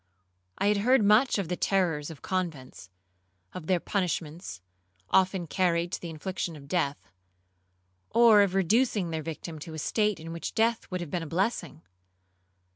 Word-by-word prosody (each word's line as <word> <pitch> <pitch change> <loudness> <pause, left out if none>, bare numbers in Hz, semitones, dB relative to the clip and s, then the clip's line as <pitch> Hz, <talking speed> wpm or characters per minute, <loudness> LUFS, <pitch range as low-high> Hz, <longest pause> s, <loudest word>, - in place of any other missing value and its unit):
I - - 0
had 210 - +3
heard 245 +3 +4
much 215 +5 +4
of 195 -4 -2
the 180 - -2
terrors 175 -7 0
of 160 -5 -11
convents,—of 95 - -7
their 185 -2 +2
punishments, 170 - -3 0.5
often 185 -1 +3
carried 170 0 0
to - - -4
the 170 - -6
infliction 170 +1 -4
of 140 -2 -12
death, 145 -3 -2 1.0
or 230 -2 +6
of 195 -2 +1
reducing 200 -1 +2
their 160 -1 -2
victim 160 +1 -7
to 160 +1 -8
a - - -6
state 210 +6 0
in 165 +1 -7
which 170 - -5
death 230 +1 +1
would 185 -1 -3
have 165 -4 -6
been 175 - -1
a 165 - -6
blessing. 170 - -2
175 Hz, 160 wpm, -28 LUFS, 155-195 Hz, 1.0 s, or